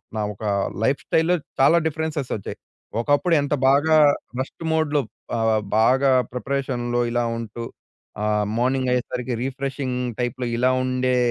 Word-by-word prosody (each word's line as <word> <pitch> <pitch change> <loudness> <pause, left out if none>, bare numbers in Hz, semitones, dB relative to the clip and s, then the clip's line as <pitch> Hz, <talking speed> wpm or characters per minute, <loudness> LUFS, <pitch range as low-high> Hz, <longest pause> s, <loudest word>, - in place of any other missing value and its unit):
నా 110 - -1
ఒక 100 - -12 0.4
లైఫ్‌స్టైల్‌లో 160 +7 +2 0.2
చాలా 140 +5 +6
డిఫరెన్సెస్ 160 -3 -2
వచ్చాయి. 100 - -6 0.4
ఒకప్పుడు 145 +8 +2
ఎంత 140 +1 -1
బాగా 145 +4 +4 0.4
రెస్ట్ 130 +5 -5
మోడ్‍లో 155 -2 +2 0.4
ఆహ్, 110 -1 +2 0.2
బాగా 130 +4 +4 0.2
ప్రిపరేషన్‍లో 125 -2 -2
ఇలా 120 0 +1
ఉంటూ 115 0 -6 0.6
ఆహ్, 105 0 +1
మార్నింగ్ 130 +1 +1
అయ్యేసరికి 125 0 -2
రిఫ్రెషింగ్ 135 -1 -3 0.2
టైప్‌లో 125 +1 -2
ఇలా 125 +2 +3
ఉండే 130 0 +1
130 Hz, 120 wpm, -23 LUFS, 120-140 Hz, 0.6 s, చాలా